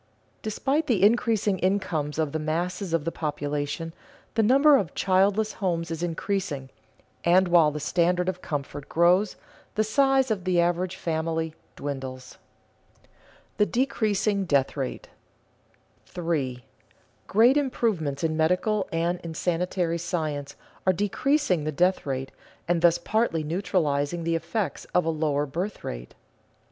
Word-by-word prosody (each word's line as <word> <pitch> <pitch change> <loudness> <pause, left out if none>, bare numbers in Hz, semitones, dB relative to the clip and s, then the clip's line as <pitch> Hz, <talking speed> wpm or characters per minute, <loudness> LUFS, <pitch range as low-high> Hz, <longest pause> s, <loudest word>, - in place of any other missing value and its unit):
Despite 275 +8 -1
the 210 -7 +2
increasing 215 -3 +3
incomes 175 -6 -1
of 155 -3 0
the 160 - -2
masses 170 +4 -2
of 165 -2 0
the 165 - -1
population, 150 +1 -3 0.4
the 225 - +2
number 275 +7 +6
of 195 -10 -3
childless 200 +3 +2
homes 170 -3 -2
is 165 0 -4
increasing, 165 -5 -2 0.5
and 180 +2 +4
while 170 -3 +5
the 150 0 -5
standard 180 +4 +1
of 185 -1 -2
comfort 145 -1 -5
grows, 180 +4 +3 0.4
the 215 - +3
size 270 +3 +3
of 195 -4 -1
the 180 -1 +2
average 175 +1 +1
family 160 -1 -2 0.2
dwindles. 130 -2 -6 0.6
[Sidenote: - - -31 0.5
The 210 - +4
decreasing 215 -5 0
death 140 -5 +1
rate] 135 -3 -4 1.0
3. 145 -8 -2 0.6
_Great 235 +6 +5
improvements 215 - 0
in 160 -1 +1
medical 180 +5 +1
and 170 +2 0
in 165 -1 -7
sanitary 175 0 -1
science 155 -5 -3 0.3
are 185 - +6
decreasing 205 - +1
the 155 - -1
death 180 +3 +1
rate 135 0 -3 0.4
and 170 -1 +1
thus 170 0 +5
partly 210 -5 0
neutralizing 165 -2 0
the 165 0 0
effects 170 +6 -3
of 180 - +4
a 165 - +1
lower 150 -2 0
birth 175 +9 -4
rate. - - -7
175 Hz, 135 wpm, -26 LUFS, 155-200 Hz, 1.0 s, number